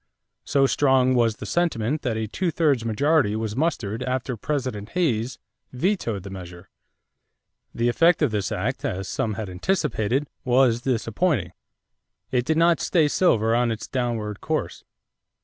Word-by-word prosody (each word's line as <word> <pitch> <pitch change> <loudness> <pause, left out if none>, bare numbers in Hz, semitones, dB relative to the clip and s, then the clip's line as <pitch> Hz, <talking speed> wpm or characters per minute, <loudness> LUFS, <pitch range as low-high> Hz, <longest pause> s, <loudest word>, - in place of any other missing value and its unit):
So 140 -1 +3
strong 130 -2 +3
was 115 -3 +2
the - - -8
sentiment 155 -5 0
that 115 -4 -2
a 110 -1 -2
two 180 - -1
thirds 150 -7 +1
majority 120 0 +2
was 110 -1 -3
mustered 120 -8 -1
after 130 0 -2
President 125 -5 -3
Hayes 130 -9 0 0.4
vetoed 125 - -1
the 100 - -8
measure. 90 -2 -10 1.0
The 115 - +1
effect 165 +7 +3
of 140 - +2
this 105 -3 -2
act, - - -2
as 95 +1 -3
some 110 -2 -2
had 110 0 -4
anticipated, 115 - -1 0.2
was 125 -2 +3
disappointing. 120 - 0 0.8
It 125 -2 +1
did 160 +2 +1
not 170 0 +4
stay 160 -4 +2
silver 115 - +2
on 120 0 +2
its 110 - -5
downward 115 -5 -3
course. - - -3
120 Hz, 150 wpm, -24 LUFS, 110-145 Hz, 1.0 s, not